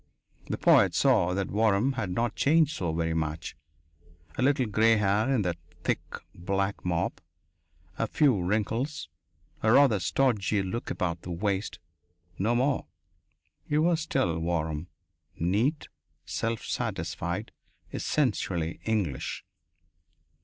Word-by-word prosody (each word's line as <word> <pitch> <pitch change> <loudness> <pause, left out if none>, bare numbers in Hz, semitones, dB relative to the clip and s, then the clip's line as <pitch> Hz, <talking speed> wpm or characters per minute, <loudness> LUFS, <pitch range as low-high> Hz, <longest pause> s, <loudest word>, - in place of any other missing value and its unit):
The - - -2
poet - - +5
saw 90 +1 +3
that 95 -1 -1
Waram 110 +4 +2
had 115 -6 -3
not 115 +3 -1
changed 155 +1 +3
so 85 - -1
very 80 0 -1
much 80 +1 -3 0.8
a - - -2
little 135 -1 +3
gray 110 +1 +4
hair 105 +3 +2
in 125 -6 +2
that 85 -2 -2 0.2
thick, - - 0 0.3
black 95 +3 -2
mop, 85 -2 -1 0.8
a - - +1
few 130 -11 +3
wrinkles, 110 - -1 0.5
a 110 - +3
rather 125 -5 +5
stodgy 105 +1 +1
look 105 +5 -4
about 85 -3 -2
the - - -9
waist. 100 +3 -2 0.6
No 110 +5 +2
more. 130 +2 +1 0.8
He 150 - +2
was 165 +1 +3
still 85 - 0
Waram, 80 -1 -2 0.5
neat, 110 - 0 0.4
self 115 0 -2
satisfied, 90 -2 -3 0.4
essentially 95 - -1
English.... 100 -12 -2
105 Hz, 120 wpm, -28 LUFS, 85-120 Hz, 0.8 s, poet